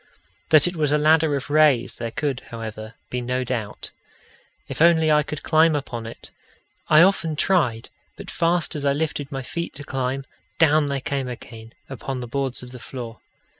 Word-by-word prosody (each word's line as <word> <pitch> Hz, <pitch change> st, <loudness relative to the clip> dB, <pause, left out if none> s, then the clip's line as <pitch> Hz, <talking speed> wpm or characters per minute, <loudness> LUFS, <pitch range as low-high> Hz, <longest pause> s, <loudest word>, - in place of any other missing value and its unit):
That 155 Hz, 0 st, +7 dB
it 175 Hz, -, -3 dB
was 150 Hz, -3 st, +1 dB
a 150 Hz, -, +4 dB
ladder 155 Hz, 0 st, +3 dB
of 140 Hz, +1 st, -5 dB
rays 150 Hz, -5 st, +4 dB
there 115 Hz, -1 st, -5 dB
could, 135 Hz, +2 st, -2 dB
however, 110 Hz, -1 st, -7 dB, 0.2 s
be 125 Hz, -, -2 dB
no 125 Hz, +1 st, -1 dB
doubt: 115 Hz, -4 st, -4 dB, 0.8 s
if -, -, -6 dB
only 160 Hz, -2 st, +5 dB
I 150 Hz, 0 st, +5 dB
could 150 Hz, 0 st, -6 dB
climb 160 Hz, 0 st, +4 dB
upon 120 Hz, -5 st, -4 dB
it! 115 Hz, -, -11 dB, 0.6 s
I 155 Hz, +2 st, +7 dB
often 175 Hz, -4 st, +2 dB
tried, 145 Hz, -10 st, +1 dB, 0.3 s
but -, -, -8 dB
fast 170 Hz, -1 st, 0 dB
as 145 Hz, -, -4 dB
I 140 Hz, -1 st, +2 dB
lifted 145 Hz, -1 st, -3 dB
my 135 Hz, -1 st, -4 dB
feet 170 Hz, +6 st, -5 dB
to 145 Hz, -, -7 dB
climb, 135 Hz, 0 st, -3 dB, 0.3 s
down 155 Hz, -2 st, +4 dB
they 140 Hz, -1 st, -2 dB
came 135 Hz, -1 st, -2 dB
again 115 Hz, -2 st, -10 dB
upon 135 Hz, 0 st, -5 dB
the 125 Hz, -, -6 dB
boards 135 Hz, 0 st, -3 dB
of 125 Hz, -, -10 dB
the 125 Hz, -, -10 dB
floor. 120 Hz, -3 st, -8 dB
140 Hz, 185 wpm, -23 LUFS, 125-155 Hz, 0.8 s, That